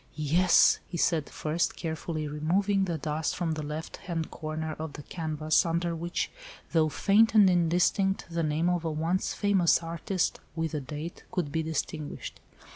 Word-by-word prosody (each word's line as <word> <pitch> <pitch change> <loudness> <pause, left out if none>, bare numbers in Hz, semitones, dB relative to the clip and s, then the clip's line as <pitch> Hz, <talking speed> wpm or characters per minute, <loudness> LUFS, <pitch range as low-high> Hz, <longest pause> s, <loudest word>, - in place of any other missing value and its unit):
"Yes," 165 +4 +4
he 175 - -5
said, 160 -4 +1
first 155 +2 -1
carefully 160 -1 -4
removing 190 +7 +1
the 170 -3 -2
dust 155 +1 -2
from 175 -3 -1
the 155 -1 -2
left 150 +2 -5
hand 165 -3 -4
corner 155 0 -4
of 160 -2 -5
the 145 - -8
canvas, 155 -1 0
under 170 0 -1
which, 170 +2 -2 0.4
though 160 -2 +3
faint 215 +7 +3
and 205 -2 +8
indistinct, 180 +2 +2
the 170 0 -2
name 155 +2 +1
of 175 -2 +1
a 165 - -1
once 165 +4 -1
famous 195 -5 +3
artist, 170 +3 -1 0.2
with 160 -1 -2
a 150 - -2
date, 150 +6 -7
could 165 -6 -2
be 160 - 0
distinguished. 155 -1 -4
165 Hz, 165 wpm, -28 LUFS, 155-175 Hz, 0.4 s, and